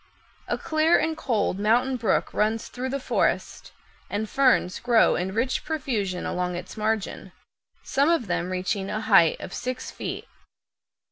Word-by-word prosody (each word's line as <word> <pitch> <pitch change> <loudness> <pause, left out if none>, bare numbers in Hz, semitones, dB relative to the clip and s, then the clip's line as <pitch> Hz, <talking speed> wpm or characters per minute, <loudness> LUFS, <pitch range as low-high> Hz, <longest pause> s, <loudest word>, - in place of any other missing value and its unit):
A - - -1
clear 315 +1 +3
and 320 0 0
cold 210 -9 -1
mountain 240 +5 +2
brook 225 -6 0
runs 220 +2 0
through 255 +1 -4
the 275 +1 -2
forest, - - -1 0.4
and 210 +2 -2
ferns 255 -8 +2
grow 240 -2 +4
in 180 +2 -2
rich 250 +3 0
profusion 230 - -2
along 180 0 -2
its 175 0 -7
margin, 215 -1 -2 0.5
some 280 +3 +2
of 335 -8 +2
them 180 -1 -2
reaching 190 +2 -2
a 215 - -2
height 195 -7 +4
of - - -8
six 255 +1 -4
feet. - - -6
220 Hz, 150 wpm, -25 LUFS, 195-260 Hz, 0.5 s, grow